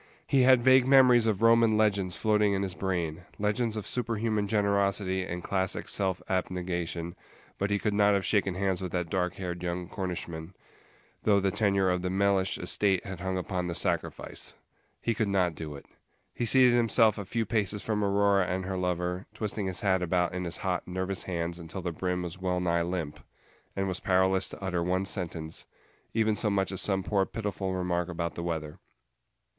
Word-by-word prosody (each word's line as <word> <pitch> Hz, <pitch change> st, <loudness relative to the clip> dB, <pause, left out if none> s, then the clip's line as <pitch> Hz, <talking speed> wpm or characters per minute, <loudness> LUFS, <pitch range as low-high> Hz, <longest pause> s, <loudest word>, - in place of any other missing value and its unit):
He 135 Hz, -, +3 dB
had 125 Hz, -1 st, +6 dB
vague 130 Hz, 0 st, +6 dB
memories 125 Hz, -4 st, +6 dB
of 110 Hz, -1 st, 0 dB
Roman 115 Hz, -1 st, +5 dB
legends 100 Hz, -4 st, +1 dB
floating 105 Hz, -2 st, +2 dB
in 100 Hz, 0 st, 0 dB
his 95 Hz, -2 st, -3 dB
brain, 85 Hz, -3 st, -3 dB
legends 110 Hz, +2 st, 0 dB
of 105 Hz, -, -4 dB
superhuman 115 Hz, -3 st, -1 dB
generosity 100 Hz, -2 st, +1 dB
and 90 Hz, -1 st, -5 dB
classic 95 Hz, -1 st, -1 dB
self 95 Hz, -3 st, 0 dB
abnegation, 90 Hz, -2 st, -2 dB, 0.4 s
but 100 Hz, -, 0 dB
he 100 Hz, -, +2 dB
could 105 Hz, 0 st, -1 dB
not 100 Hz, 0 st, +4 dB
have 95 Hz, -, 0 dB
shaken 100 Hz, -3 st, +1 dB
hands 95 Hz, -1 st, 0 dB
with 90 Hz, -2 st, -4 dB
that 90 Hz, -2 st, -2 dB
dark 90 Hz, -2 st, 0 dB
haired 90 Hz, -2 st, -5 dB
young 90 Hz, 0 st, -3 dB
Cornishman, 90 Hz, -2 st, -5 dB, 0.7 s
though 100 Hz, -2 st, +4 dB
the 95 Hz, 0 st, +1 dB
tenure 100 Hz, -2 st, +2 dB
of 90 Hz, 0 st, 0 dB
the 90 Hz, -, -2 dB
Mellish 95 Hz, 0 st, +1 dB
estate 95 Hz, +1 st, +1 dB
had 95 Hz, -2 st, -6 dB
hung 95 Hz, +1 st, -2 dB
upon 90 Hz, 0 st, -2 dB
the 85 Hz, -, -3 dB
sacrifice. -, -, -2 dB, 0.4 s
He 115 Hz, -, 0 dB
could 110 Hz, -1 st, 0 dB
not 95 Hz, -3 st, +1 dB
do 75 Hz, -2 st, -7 dB
it. 70 Hz, -, -11 dB, 0.5 s
He 120 Hz, -, -2 dB
seated 125 Hz, +1 st, +5 dB
himself 115 Hz, -2 st, +4 dB
a -, -, -3 dB
few 115 Hz, +4 st, -2 dB
paces 105 Hz, -2 st, -1 dB
from 105 Hz, -2 st, -1 dB
Aurora 100 Hz, -1 st, +3 dB
and 95 Hz, +1 st, -2 dB
her 95 Hz, 0 st, -3 dB
lover, 90 Hz, +1 st, -2 dB
twisting 105 Hz, -2 st, -2 dB
his 90 Hz, -1 st, -3 dB
hat 95 Hz, -2 st, +2 dB
about 90 Hz, 0 st, +1 dB
in 90 Hz, 0 st, -3 dB
his 85 Hz, +1 st, -4 dB
hot, 90 Hz, -3 st, -2 dB
nervous 95 Hz, +1 st, -3 dB
hands 85 Hz, -1 st, -3 dB
until 85 Hz, +2 st, -7 dB
the 90 Hz, -, -2 dB
brim 90 Hz, +2 st, -2 dB
was 90 Hz, +1 st, -6 dB
wellnigh 90 Hz, -2 st, +1 dB
limp, 85 Hz, -4 st, -3 dB, 0.6 s
and 95 Hz, 0 st, -1 dB
was 95 Hz, -1 st, -2 dB
powerless 95 Hz, 0 st, +2 dB
to -, -, -8 dB
utter 90 Hz, -2 st, -1 dB
one 90 Hz, +2 st, 0 dB
sentence, 85 Hz, -4 st, -4 dB, 0.4 s
even 110 Hz, -1 st, +1 dB
so 105 Hz, -, 0 dB
much 95 Hz, -1 st, 0 dB
as 95 Hz, -, -1 dB
some 95 Hz, -2 st, +1 dB
poor 100 Hz, 0 st, +1 dB
pitiful 100 Hz, -2 st, -3 dB
remark 90 Hz, -1 st, -1 dB
about 85 Hz, -1 st, -3 dB
the -, -, -5 dB
weather. 80 Hz, -3 st, -4 dB
95 Hz, 190 wpm, -29 LUFS, 90-105 Hz, 0.7 s, had